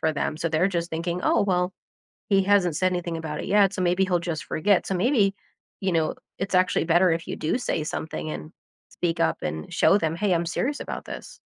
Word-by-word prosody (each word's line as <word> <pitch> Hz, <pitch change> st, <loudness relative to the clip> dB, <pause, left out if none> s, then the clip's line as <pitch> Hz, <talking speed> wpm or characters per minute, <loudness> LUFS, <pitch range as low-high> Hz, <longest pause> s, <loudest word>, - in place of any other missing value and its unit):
for 160 Hz, 0 st, +1 dB
them. 150 Hz, +1 st, -2 dB
So 165 Hz, +1 st, -1 dB
they're 165 Hz, +5 st, +2 dB
just 170 Hz, -2 st, -2 dB
thinking, 170 Hz, +2 st, -2 dB
"Oh, -, -, +3 dB
well, 180 Hz, -2 st, +1 dB, 0.6 s
he 195 Hz, -2 st, +4 dB
hasn't 190 Hz, -4 st, +3 dB
said 185 Hz, 0 st, +2 dB
anything 175 Hz, -2 st, -2 dB
about 160 Hz, -2 st, -5 dB
it -, -, -6 dB
yet, 200 Hz, -1 st, +4 dB
so 185 Hz, -, -2 dB
maybe 180 Hz, +2 st, +2 dB
he'll 180 Hz, -2 st, +1 dB
just 170 Hz, -3 st, -4 dB
forget." 195 Hz, +4 st, +1 dB
So 195 Hz, -, -1 dB
maybe, 200 Hz, 0 st, +2 dB, 0.5 s
you 190 Hz, -2 st, 0 dB
know, 160 Hz, -2 st, +1 dB, 0.2 s
it's 195 Hz, 0 st, -3 dB
actually 185 Hz, -1 st, +3 dB
better 175 Hz, +2 st, +4 dB
if 165 Hz, +1 st, -3 dB
you -, -, -3 dB
do 155 Hz, -, 0 dB
say 160 Hz, -10 st, -2 dB
something 155 Hz, 0 st, -4 dB
and 155 Hz, +1 st, -7 dB, 0.4 s
speak 170 Hz, -2 st, -2 dB
up -, -, +1 dB
and 80 Hz, -, -4 dB
show 190 Hz, -, +4 dB
them, 165 Hz, -1 st, -1 dB
"Hey, 195 Hz, -1 st, +1 dB
I'm 170 Hz, 0 st, 0 dB
serious 270 Hz, -, -1 dB
about -, -, -5 dB
this." -, -, -9 dB
175 Hz, 225 wpm, -25 LUFS, 165-195 Hz, 0.6 s, he